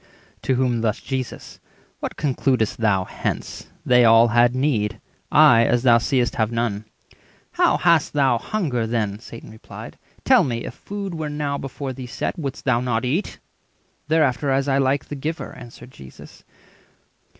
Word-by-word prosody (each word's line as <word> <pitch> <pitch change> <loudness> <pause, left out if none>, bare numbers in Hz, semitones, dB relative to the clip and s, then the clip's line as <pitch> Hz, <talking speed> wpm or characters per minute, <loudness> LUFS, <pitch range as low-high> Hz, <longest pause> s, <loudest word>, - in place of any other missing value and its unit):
To 130 - 0
whom 125 -2 0
thus 110 -1 0
Jesus:—"What 130 -2 -7
conclud'st 130 -5 0
thou 105 -5 +1
hence? - - -5 0.2
They 125 -1 +5
all 115 0 +6
had 120 +1 +3
need; 125 -7 0 0.3
I, 115 -1 +6
as 120 +1 +1
thou 120 -2 +6
seest, 120 -2 0
have 110 0 0
none." 115 -3 -2 0.7
"How - - +2
hast 170 -4 +2
thou 135 -5 +2
hunger 135 - -2
then?" 105 -3 -2
Satan 115 -1 -11
replied. 110 - -11 0.3
"Tell - - +5
me, 120 -3 -3
if - - -6
food 200 -2 -6
were 160 -2 -4
now 145 -1 -3
before 135 0 -6
thee 130 0 -8
set, 120 - -3
320 165 - -8
Wouldst 135 -1 -5
thou 130 -3 +2
not 125 -1 -1
eat?" 155 +11 -2 0.7
"Thereafter 150 -3 +1
as 135 +1 +1
I 135 0 +2
like 135 +1 +1
the 145 - -7
giver," 155 +4 -5
answered 120 0 -12
Jesus. 65 - -14
125 Hz, 160 wpm, -22 LUFS, 115-140 Hz, 0.7 s, all